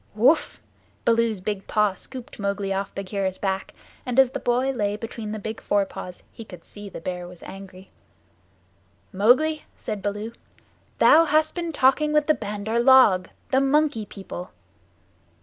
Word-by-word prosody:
"Whoof!" 260 Hz, +9 st, +3 dB, 0.5 s
Baloo's 230 Hz, -3 st, +2 dB
big 195 Hz, 0 st, -4 dB
paw 210 Hz, -2 st, +2 dB
scooped 250 Hz, +4 st, -10 dB
Mowgli 200 Hz, -1 st, -1 dB
off 195 Hz, 0 st, -4 dB
Bagheera's 195 Hz, -1 st, -3 dB
back, 190 Hz, -1 st, -2 dB, 0.3 s
and 250 Hz, 0 st, -4 dB
as 265 Hz, -2 st, +5 dB
the -, -, -4 dB
boy 250 Hz, +2 st, +1 dB
lay 205 Hz, -5 st, -1 dB
between 225 Hz, -1 st, -6 dB
the 215 Hz, -, -4 dB
big 220 Hz, +1 st, -6 dB
fore 205 Hz, -1 st, +1 dB
paws 180 Hz, -1 st, -9 dB
he 225 Hz, -, -10 dB
could 180 Hz, -6 st, -13 dB
see 205 Hz, -1 st, -10 dB
the -, -, -8 dB
Bear 180 Hz, +1 st, -5 dB
was 180 Hz, -1 st, -13 dB
angry. 190 Hz, -1 st, -11 dB, 1.2 s
"Mowgli," 265 Hz, +11 st, +3 dB
said 210 Hz, -2 st, -5 dB
Baloo, 205 Hz, +3 st, -3 dB, 0.7 s
"thou 325 Hz, +2 st, +6 dB
hast 310 Hz, 0 st, +2 dB
been 340 Hz, -2 st, -3 dB
talking 300 Hz, +2 st, +3 dB
with 300 Hz, -1 st, +3 dB
the 310 Hz, -, +4 dB
Bandar 210 Hz, 0 st, -3 dB
log 235 Hz, -8 st, +6 dB, 0.2 s
the 265 Hz, -, +4 dB
Monkey 275 Hz, -5 st, +1 dB
People." 190 Hz, -3 st, -8 dB
215 Hz, 155 wpm, -24 LUFS, 195-260 Hz, 1.2 s, thou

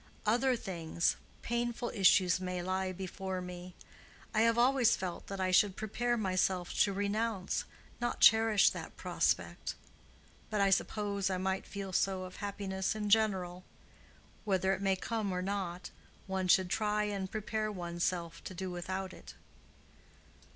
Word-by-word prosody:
Other 245 Hz, +4 st, +3 dB
things—painful 230 Hz, +6 st, -2 dB
issues 185 Hz, -3 st, +4 dB
may 180 Hz, -1 st, -3 dB
lie 185 Hz, +1 st, -1 dB
before 190 Hz, 0 st, -4 dB
me. 180 Hz, 0 st, -8 dB, 0.6 s
I 215 Hz, -, +3 dB
have 230 Hz, 0 st, +4 dB
always 245 Hz, -1 st, +4 dB
felt 180 Hz, -2 st, -5 dB
that 195 Hz, -1 st, -5 dB
I 185 Hz, 0 st, +1 dB
should 190 Hz, +1 st, +4 dB
prepare 240 Hz, +3 st, -1 dB
myself 185 Hz, -3 st, 0 dB
to 200 Hz, -, +4 dB
renounce, 205 Hz, 0 st, -1 dB, 0.3 s
not 240 Hz, 0 st, -2 dB
cherish 220 Hz, -2 st, +6 dB
that -, -, -8 dB
prospect. -, -, -1 dB, 0.7 s
But 215 Hz, -, -1 dB
I 195 Hz, -1 st, +4 dB
suppose 200 Hz, 0 st, 0 dB
I 185 Hz, -, 0 dB
might 190 Hz, +1 st, -2 dB
feel 195 Hz, -2 st, -6 dB
so 190 Hz, 0 st, +1 dB
of 185 Hz, 0 st, -9 dB
happiness 195 Hz, -1 st, -2 dB
in 210 Hz, -1 st, -2 dB
general. 190 Hz, -5 st, +2 dB, 0.8 s
Whether 190 Hz, -2 st, +2 dB
it 190 Hz, -, -4 dB
may 195 Hz, -1 st, +2 dB
come 215 Hz, 0 st, -2 dB
or 180 Hz, 0 st, -2 dB
not, 185 Hz, -2 st, -3 dB, 0.3 s
one 190 Hz, -1 st, -2 dB
should 180 Hz, 0 st, +4 dB
try 210 Hz, +1 st, +1 dB
and 200 Hz, -2 st, -2 dB
prepare 215 Hz, 0 st, -2 dB
one's 175 Hz, -3 st, -4 dB
self 170 Hz, -2 st, -2 dB
to 185 Hz, -, -6 dB
do 185 Hz, +1 st, -4 dB
without 185 Hz, +2 st, -4 dB
it." -, -, -12 dB
195 Hz, 145 wpm, -33 LUFS, 185-215 Hz, 0.8 s, cherish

